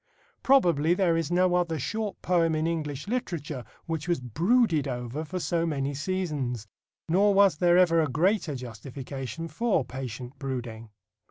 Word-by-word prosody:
Probably 175 - +4
there 180 -3 +2
is 165 -2 -1
no 180 +1 +3
other 175 -2 +1
short 210 - -3
poem 165 -3 +2
in 155 +1 0
English 150 -2 -3
literature 165 - -3 0.2
which 165 -1 -3
was 175 -4 +1
brooded 165 - +2
over 125 +3 -4
for 180 +4 -4
so 170 -1 0
many 145 -4 -1
seasons. 145 - -2 0.4
Nor 195 +4 +3
was 195 -5 +5
there 175 +1 +4
ever 170 -2 +5
a 155 - +1
greater 170 +2 +1
justification 130 +4 -6
for 215 - 0
patient 130 0 -7
brooding. 120 -5 -5
160 Hz, 150 wpm, -27 LUFS, 135-180 Hz, 0.4 s, was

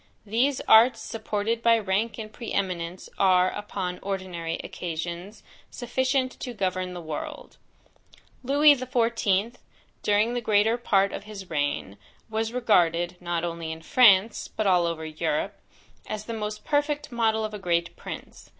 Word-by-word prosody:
These 245 +6 +1
arts, 230 +1 +6
supported 225 0 -2
by 230 0 +5
rank 210 +2 -1
and 215 -2 -7
pre 235 - -7
eminence, 180 -2 -2
are, 185 -1 +4
upon 185 -3 -4
ordinary 185 -4 -4
occasions, 175 +4 -6 0.3
sufficient 260 +1 0
to 245 -2 -6
govern 185 -2 -2
the - - -5
world. 155 -2 -7 0.9
Lewis 285 +1 +5
XIV. 235 -3 +1 0.4
during 210 +3 +2
the 245 - -1
greater 215 +1 +3
part 200 -4 +2
of - - -6
his 200 -4 -9
reign, 145 -9 -2 0.3
was 220 +1 -1
regarded, 175 -8 +2
not 175 -1 -2
only 170 -1 -4
in 160 0 -8
France, 210 -1 +5
but 215 - -3
over 170 -4 +2
all - - -5
Europe, 155 -1 -2 0.5
as 215 0 -5
the 230 - -5
most 210 -1 -5
perfect 295 -1 0
model 220 -2 +1
of 215 - -6
a 210 - -5
great 170 -2 0
prince. - - -9
205 Hz, 145 wpm, -26 LUFS, 175-230 Hz, 0.9 s, arts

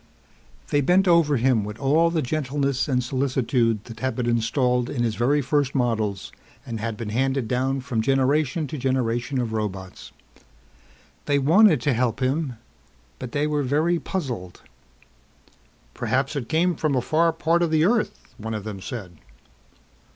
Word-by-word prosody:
They 145 - +3
bent 180 +7 +3
over 165 -5 +4
him 120 -2 +2
with 105 +1 -6
all 150 +5 +3
the 165 -2 -1
gentleness 140 -1 -1
and 125 -3 +1
solicitude 125 -4 0
that 115 -1 -11
had 130 +3 -2
been 125 - -2
installed 120 +1 +1
in 120 -4 -1
his 115 -2 0
very 140 +6 +1
first 140 0 0
models 110 -6 -1 0.3
and 115 -2 -5
had 115 0 -3
been 110 -1 -5
handed 130 +2 0
down 130 +2 0
from 125 -4 -2
generation 135 +4 +1
to 145 +1 -6
generation 125 0 -1
of 115 -3 -2
robots. 95 -4 -5 1.2
They 145 - +3
wanted 165 +6 +5
to 145 -3 +1
help 120 -1 0
him 135 +1 0 0.7
but 125 - -6
they 145 0 0
were 150 -1 0
very 155 +6 +1
puzzled. 125 - -5 1.3
"Perhaps 135 +3 -1
it 125 -5 -4
came 175 +3 +2
from 150 -2 0
a 125 - +2
far 165 +6 +2
part 165 +1 +1
of 170 - +2
the 155 0 +3
earth," 220 +3 -1
one 110 +1 -4
of 105 - -5
them 100 -3 -6
said. 95 -5 -7
130 Hz, 160 wpm, -24 LUFS, 115-150 Hz, 1.3 s, wanted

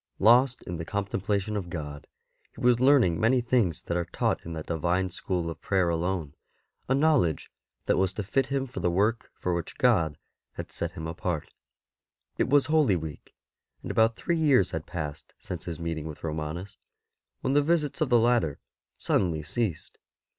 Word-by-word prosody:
Lost 125 +4 +5
in 85 - -5
the 80 - -4
contemplation 100 +2 -2
of 95 -4 -3
God, 75 -4 -6 0.5
he - - -12
was 120 -1 +4
learning 130 - +4
many 125 +4 +4
things 120 -8 +1
that 85 - -3
are 85 -1 0
taught - - -1
in 85 - -6
that 80 -1 -5
divine 90 +3 0
school 90 -1 -2
of 80 - -6
prayer 95 -3 +1
alone, 85 -3 -1 0.6
a 130 - +4
know 150 +1 +4
ledge 80 -8 -1 0.3
that - - +2
was 95 -1 +2
to 105 - -3
fit 130 +7 0
him 135 -1 -1
for 125 - -7
the 90 - +1
work 105 +6 +1
for 90 - -2
which 85 -1 -4
God 80 -3 +3 0.4
had - - -7
set - - -3
him 80 - -6
apart. 80 -1 -3 0.9
It - - +2
was 145 0 +5
Holy 155 -10 +3
Week; 80 -3 -7 0.5
and - - -4
about 115 0 +3
three 170 +6 -1
years 135 - +4
had 80 -1 -4
passed 75 -4 -6
since 85 -3 -7
his 85 -3 -5
meeting 80 -2 -3
with 75 - -9
Romanus, 80 +4 -4 0.6
when 130 - 0
the 145 - +5
visits 155 0 0
of 155 - +2
the 120 - +6
latter 115 - +2 0.4
suddenly 80 -5 +1
ceased. 85 0 -3
95 Hz, 180 wpm, -27 LUFS, 80-120 Hz, 0.9 s, the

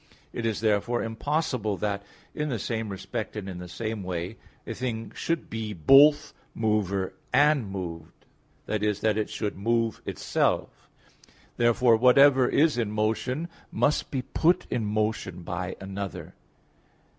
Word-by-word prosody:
It 115 -1 -2
is 110 -2 -2
therefore 110 +2 +1
impossible 115 -3 -1
that 100 -1 -2 0.3
in 150 0 -2
the 125 - -1
same 110 +1 -3
respect 105 +4 -5
and 105 -2 -5
in 90 -2 -6
the 90 - -7
same 110 +3 -4
way 90 +2 -4 0.3
a 115 - -4
thing 115 -2 -4
should 165 -1 -2
be 110 -1 -4
both 145 - +6 0.2
mover 100 -4 0 0.2
and 145 -7 +4
moved, 85 -4 -7 0.4
i.e. 105 0 +1
that 105 +1 0
it 105 - -2
should 105 - -3
move 115 +3 0
itself. - - -1 0.7
Therefore, 120 0 +4
whatever 130 +2 +6
is 150 -4 +3
in 115 -3 0
motion 110 +8 -1 0.2
must 150 - +1
be 130 -2 -2
put 170 +7 +2
in 115 - 0
motion 105 -4 -2
by 90 +2 -4
another. 95 0 -6
110 Hz, 140 wpm, -27 LUFS, 100-125 Hz, 0.7 s, both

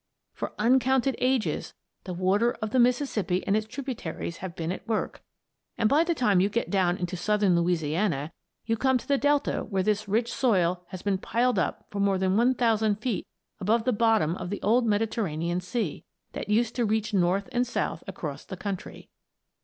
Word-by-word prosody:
For - - -5
uncounted 260 +3 +3
ages, 255 -3 0 0.3
the 185 - -4
water 200 +6 +2
of 220 -2 -5
the 255 - +2
Mississippi 240 -7 +1
and 195 - +2
its 215 0 0
tributaries 225 - -5
have 180 -2 -7
been 165 0 -3
at 185 - -7
work, 220 -2 -2 0.6
and 225 - +3
by 295 +7 +4
the 340 0 0
time 210 -9 +3
you 195 - +2
get 235 +3 -2
down 185 -2 +2
into 180 0 -3
southern 205 +1 +2
Louisiana 170 -2 0 0.3
you 225 0 0
come 260 +2 +3
to - - -10
the 280 -1 +2
delta 290 0 +1
where 190 -3 -1
this 210 +1 0
rich 225 +4 0
soil 185 -9 +2
has 185 - -8
been 195 -2 0
piled 240 0 +1
up - - -2
for 205 - -4
more 200 -1 +2
than 190 0 +1
1,000 225 -3 +3
feet 220 0 -3 0.3
above 220 +4 +2
the 255 - +2
bottom 220 -7 +2
of 175 - -5
the 205 - -3
old 235 +4 +3
Mediterranean 195 -6 0
Sea, 185 - -3 0.3
that - - -6
used 230 +2 +2
to 240 - +2
reach 215 0 0
north 190 +1 +2
and 245 0 +1
south - - -2
across - - -6
the - - -8
country. 200 -3 -6
210 Hz, 185 wpm, -27 LUFS, 185-240 Hz, 0.6 s, by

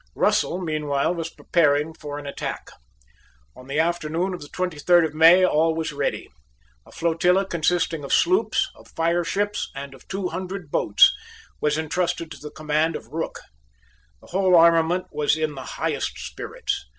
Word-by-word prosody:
Russell 180 - +1
meanwhile 155 -2 -1
was 165 -2 -4
preparing 150 -2 +1
for 145 -2 -7
an 145 - -8
attack. 140 - -5 0.8
On 130 0 -14
the 140 +2 -1
afternoon 170 +2 0
of 180 - -7
the 145 - -9
twenty 180 -4 -3
third 175 +2 +5
of 155 - -4
May 165 +4 +7
all 160 -1 +2
was 160 -1 -3
ready. 140 -1 -2 0.6
A - - -16
flotilla 180 +3 +2
consisting 170 -2 0
of 140 - -6
sloops, 370 +3 +2
of - - -18
fireships, 175 +5 0
and 140 0 -7
of 135 - -17
two 190 -1 -3
hundred 185 -2 -6
boats, 100 - +5 0.5
was 150 0 +1
entrusted 165 +1 -2
to - - -9
the 150 - -8
command 155 +2 -1
of - - -8
Rooke. 165 +2 -4 0.8
The - - -17
whole 185 0 +3
armament 170 +2 +4
was 150 +1 +1
in 155 -1 -1
the 135 - -8 0.2
highest - - -2
spirits. - - -5
165 Hz, 160 wpm, -23 LUFS, 150-180 Hz, 0.8 s, May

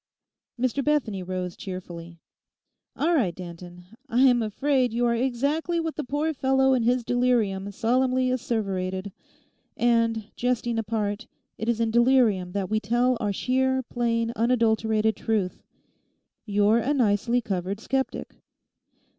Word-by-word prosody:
_' 255 - +1
Mr 275 +2 -1
Bethany 255 -10 0
rose 180 -1 -4
cheerfully. 175 -3 -8 0.8
'All 335 +4 +1
right, 210 - +1
Danton; 175 0 -10 0.2
I 245 +1 +2
am 245 -3 +5
afraid 250 +3 0
you 240 +1 +1
are 235 - +2
exactly 280 +8 0
what 325 -1 -3
the 305 - -3
poor 295 +4 -1
fellow 265 -1 +2
in 255 - +2
his 245 +2 +1
delirium 230 -6 0
solemnly 255 +4 +1
asseverated. 195 -6 -2 0.7
And, 230 -2 +1
jesting 240 -1 -1
apart, 210 0 -2 0.3
it 220 - -2
is 235 -1 +1
in 225 -1 +1
delirium 235 -7 +3
that 200 -2 -2
we 215 +2 0
tell 240 +4 +1
our 205 -2 -1
sheer, 260 +4 0
plain, 230 -1 -1
unadulterated 220 -2 +2
truth: 210 -5 -1 0.9
you're 205 +2 +3
a 275 +6 0
nicely 235 0 +2
covered 195 -3 -3
sceptic. 265 +4 -3
230 Hz, 135 wpm, -25 LUFS, 205-255 Hz, 0.9 s, am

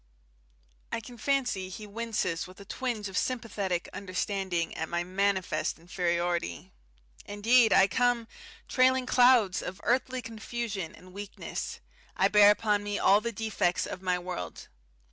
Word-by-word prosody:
I - - -1
can 240 +1 -12
fancy 245 -9 0
he 210 +3 -8
winces 210 -6 -2
with 185 +2 -14
a 200 - -11
twinge 225 -2 -3
of 190 - -8
sympathetic 200 -8 -1
understanding 185 -2 -2
at 160 - -3
my 175 0 -1
manifest 190 -3 0
inferiority. 170 - -2 0.6
Indeed, 225 +3 +4
I 195 - +7
come, 240 +2 +1 0.4
trailing 260 -1 +3
clouds 245 -7 +5
of 185 +2 -6
earthly 255 0 0
confusion 225 -5 -5
and 180 +2 -16
weakness; 200 +1 -6 0.4
I - - +4
bear 210 -1 +7
upon 210 0 +2
me 205 0 -3
all 200 +2 +5
the 235 +1 -2
defects 215 -5 0
of 180 - -6
my 180 -1 +1
world. 175 - -6
200 Hz, 140 wpm, -29 LUFS, 180-230 Hz, 0.6 s, I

